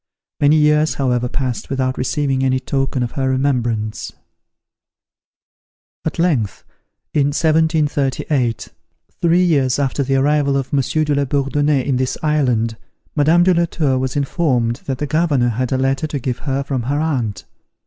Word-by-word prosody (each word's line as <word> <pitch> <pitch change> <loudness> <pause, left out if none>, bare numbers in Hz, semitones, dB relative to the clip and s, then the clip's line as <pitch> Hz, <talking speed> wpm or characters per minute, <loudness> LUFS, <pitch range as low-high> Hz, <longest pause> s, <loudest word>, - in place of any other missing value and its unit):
Many 145 +1 +4
years, 150 0 +3
however 125 -2 0
passed 130 -3 -3
without 130 -1 -1
receiving 135 0 -1
any 130 0 +2
token 135 -1 -1
of 120 - -3
her 135 -3 -1
remembrance. 120 -5 -1 1.9
At 160 - -3
length, 150 - 0 0.5
in 145 -2 +2
1738, 145 -5 0 0.5
three 175 +1 +3
years 140 -7 +2
after 140 0 -1
the 135 0 0
arrival 140 0 +2
of 135 0 -4
Monsieur 140 +3 +1
de 150 -1 0
la 140 0 +1
Bourdonnais 140 0 0
in 135 -3 0
this 130 0 -1
island, 125 -7 +1 0.4
Madame 160 +4 +4
de 185 +1 +4
la 170 0 +2
Tour 140 -6 0
was 130 +1 -2
informed 130 -5 0
that 135 -2 -2
the 150 - -2
Governor 145 -5 +1
had 125 +2 -2
a 130 - +1
letter 135 +3 0
to 150 - -3
give 125 -2 -3
her 135 -1 -2
from 135 -2 -2
her 140 +5 -1
aunt. 125 -11 -2
135 Hz, 155 wpm, -18 LUFS, 130-150 Hz, 1.9 s, Many